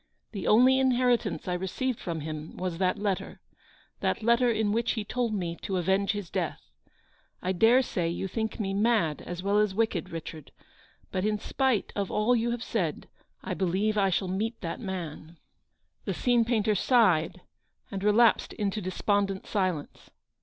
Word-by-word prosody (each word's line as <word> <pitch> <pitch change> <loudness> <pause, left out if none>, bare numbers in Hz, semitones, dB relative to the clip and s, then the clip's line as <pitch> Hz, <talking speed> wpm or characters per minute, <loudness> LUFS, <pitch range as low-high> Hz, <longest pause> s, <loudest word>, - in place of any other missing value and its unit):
The 195 -4 -4
only 255 +4 +6
inheritance 250 -5 +1
I 180 - 0
received 205 +8 -2
from 165 -3 -4
him 155 0 -6
was 180 -2 -3
that 185 -1 +2
234 - - -8 0.2
letter; - - -14 0.6
that - - -1
letter 235 +2 +4
in 220 -2 +1
which 230 +2 +1
he 220 - -3
told 245 +1 -1
me 175 -4 -2
to 190 - -2
avenge 190 +3 +1
his 205 -5 -6
death. - - -4 0.7
I 185 - -1
dare 225 +8 +5
say 175 -8 -1
you 175 +3 -3
think 220 +4 -3
me 195 -2 -1
mad 205 -7 +1
as 175 +1 -6
well 200 +1 +2
as 210 -2 +1
wicked,, 215 -6 0
Richard; 160 -2 -8 0.6
but 185 - -1
in 210 0 +1
spite 260 +1 0
of 200 -2 -1
all 220 +4 +2
you 235 0 0
have 240 0 -2
said, 175 -9 -2 0.3
/ - - -5
believe 195 +4 +1
that 210 -1 +2
I - - +2
shall 190 +1 0
meet 215 +5 -2
that 165 -4 -4
man! 170 -5 -6 0.3
" - - -44
The - - -2
scene 240 -2 +2
painter 220 -3 +1
sighed 185 -6 +3 0.5
and 195 -1 -4
relapsed 215 +3 +4
into 210 0 -2
despondent 195 +1 -1
silence. 185 -8 -2
200 Hz, 175 wpm, -28 LUFS, 180-230 Hz, 0.7 s, only